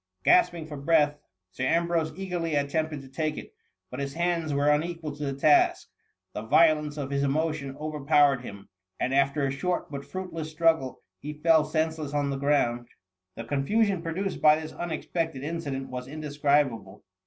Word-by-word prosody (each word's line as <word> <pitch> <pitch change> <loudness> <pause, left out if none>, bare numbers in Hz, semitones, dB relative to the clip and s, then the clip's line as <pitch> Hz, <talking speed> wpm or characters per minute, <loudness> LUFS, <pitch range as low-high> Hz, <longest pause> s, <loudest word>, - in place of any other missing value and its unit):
Gasping 175 - +4
for 150 -2 -8
breath, 150 0 +2 0.3
Sir 125 - -5
Ambrose 165 +1 +1
eagerly 175 -4 -2
at 140 0 0
tempted 155 -2 -1
to 135 - -13
take 155 +3 -2
itj - - -9 0.4
but 125 - -6
his 140 +1 -4
hands 170 -2 0
were 145 +1 +3
unequal 155 0 -2
to 150 - -6
the 140 -1 -2
task, 150 +1 +4 0.4
the - - -4
violence 150 +4 +3
of 140 -2 -4
his 140 0 0
emotion 140 -1 -1
over 155 -1 -5
powered 140 -3 +4
him, 100 -5 -10 0.3
and 130 - -1
after 140 +1 +2
a 135 - 0
short, 175 +6 -2
but 140 -1 -5
fruitless 165 0 -6
struggle, 160 -4 +1 0.2
he 150 +1 -6
fell 160 +1 +4
senseless 155 -2 -2
on 145 -1 0
the 135 - -2
ground. 125 -4 +1
70 - - -33
THE - - -27
MUMMY. 95 0 -55 0.2
The - - +1
confusion 195 +6 +1
produced 180 +4 -3
by 150 0 +7
this 155 -1 -8
unexpected 165 -3 -3
incident 145 -4 -4
was 125 0 -5
indescribable. 145 -8 -1
150 Hz, 180 wpm, -27 LUFS, 140-165 Hz, 0.4 s, by